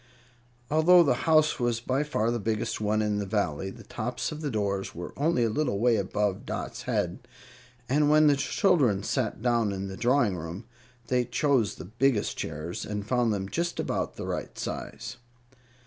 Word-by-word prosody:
Although 170 +3 +6
the 145 - +3 0.2
house 155 -1 +4
was 120 -2 +1
by 130 +3 0
far 120 -7 0
the 120 - -1
biggest 110 0 -2
one 110 +1 +1
in 105 -1 0
the 100 - -2
Valley, 95 -3 -1
the - - -11
tops 120 +5 -3
of 155 0 -6
the 150 - -2
doors 100 -4 -2
were 85 +1 -6
only 145 -4 +2
a 115 - +2
little 125 -4 0
way 120 +2 +3
above 100 0 -1
Dot's - - -5
head, 105 0 -1 0.6
and 145 +4 +3
when 155 +1 +6
the 145 -1 +5
children 140 - +2
sat 125 0 -2
down 120 -4 +2
in 95 0 -4
the 95 - -6
drawing 120 -3 +2
room 85 +5 -6 0.4
they 125 0 +1
chose 125 -2 +1
the - - -9
biggest 115 +3 +1
chairs, 80 +3 -5
and 105 -1 -4
found 120 -2 +2
them 95 -2 -2
just 170 - -2
about - - -2
the - - -6
right - - -4
size. 120 +1 -5
115 Hz, 180 wpm, -28 LUFS, 100-140 Hz, 0.6 s, Although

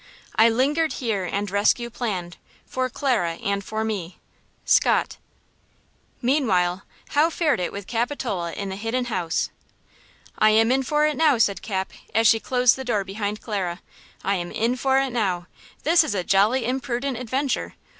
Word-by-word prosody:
I 225 +1 +6
lingered 290 +7 +1
here 220 -8 -2
and 200 +2 -3
rescue 215 +4 +2
planned 185 -8 -4 0.3
For 255 0 -2
Clara 235 -11 0
and 200 +4 -2
for 220 +2 -3
me. 195 -6 -4 0.5
–SCOTT. - - +3 1.1
MEANWHILE 195 -10 +2 0.3
how 300 +3 +3
fared 315 - +1
it 180 - -2
with 200 -1 -7
Capitola 230 -6 -2
in 200 -1 -4
the 190 - -5
Hidden 235 +2 -2
House? 170 -4 -1 0.9
"I 215 - +6
am 225 +2 +4
in 265 +1 +3
for 300 +3 +1
it 305 -1 0
now!" 305 -5 +4
said 205 -3 +2
Cap, 190 -3 -3 0.2
as 225 +1 +3
she 225 0 +6
closed 250 +1 +3
the 265 - -5
door 225 -6 0
behind 205 +2 -4
Clara; 185 -5 -3 0.4
"I 195 0 +1
am 175 -1 -5
in 235 +3 0
for 265 +1 +2
it 270 -1 +1
now! 190 -7 -1 0.4
This 330 +2 +5
is 220 - -2
a 185 - -1
jolly 215 +7 +3
imprudent 255 +1 -2
adventure! 260 +3 -2
225 Hz, 165 wpm, -24 LUFS, 195-260 Hz, 1.1 s, I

